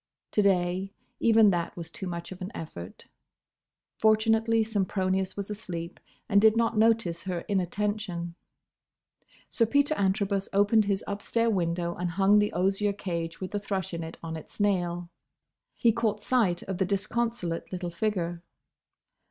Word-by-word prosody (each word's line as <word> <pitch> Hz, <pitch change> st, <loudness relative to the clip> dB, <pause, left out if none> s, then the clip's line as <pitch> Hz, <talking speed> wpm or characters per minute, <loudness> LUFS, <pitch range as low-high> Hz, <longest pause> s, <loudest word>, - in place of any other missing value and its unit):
To 210 Hz, -, +3 dB
day, 190 Hz, 0 st, +1 dB, 0.2 s
even 225 Hz, -2 st, +6 dB
that 170 Hz, -1 st, -2 dB
was 165 Hz, -1 st, -7 dB
too 190 Hz, -, -6 dB
much 170 Hz, 0 st, -5 dB
of 185 Hz, 0 st, -9 dB
an 185 Hz, +3 st, -5 dB
effort. 90 Hz, -, -8 dB, 0.9 s
Fortunately 225 Hz, +1 st, +3 dB
Sempronius 190 Hz, -3 st, -1 dB
was 200 Hz, +1 st, -4 dB
asleep 175 Hz, -5 st, -5 dB, 0.3 s
and 200 Hz, -3 st, +4 dB
did 220 Hz, +1 st, +5 dB
not 230 Hz, 0 st, +2 dB
notice 220 Hz, -6 st, +2 dB
her 180 Hz, -2 st, -2 dB
inattention. 195 Hz, -2 st, -2 dB, 1.1 s
Sir 230 Hz, -, +1 dB
Peter 285 Hz, +5 st, +3 dB
Antrobus 195 Hz, -3 st, 0 dB
opened 205 Hz, +2 st, +4 dB
his 200 Hz, -1 st, 0 dB
upstair 230 Hz, +3 st, 0 dB
window 170 Hz, -2 st, 0 dB
and 175 Hz, 0 st, -3 dB
hung 195 Hz, +4 st, +4 dB
the 210 Hz, 0 st, +1 dB
osier 195 Hz, +3 st, +1 dB
cage 170 Hz, -4 st, -4 dB
with 185 Hz, -, -5 dB
the 205 Hz, -, -1 dB
thrush 195 Hz, -4 st, -3 dB
in 170 Hz, -, -3 dB
it 160 Hz, -, -8 dB
on 160 Hz, -1 st, -4 dB
its 160 Hz, -, -10 dB
nail. 175 Hz, -4 st, 0 dB, 0.6 s
He 235 Hz, -, +4 dB
caught 215 Hz, -2 st, -1 dB
sight 210 Hz, -9 st, +2 dB
of 190 Hz, -1 st, -5 dB
the 190 Hz, -, +3 dB
disconsolate 200 Hz, -2 st, -2 dB
little 180 Hz, -2 st, -4 dB
figure. 175 Hz, -2 st, -2 dB
195 Hz, 150 wpm, -28 LUFS, 175-215 Hz, 1.1 s, even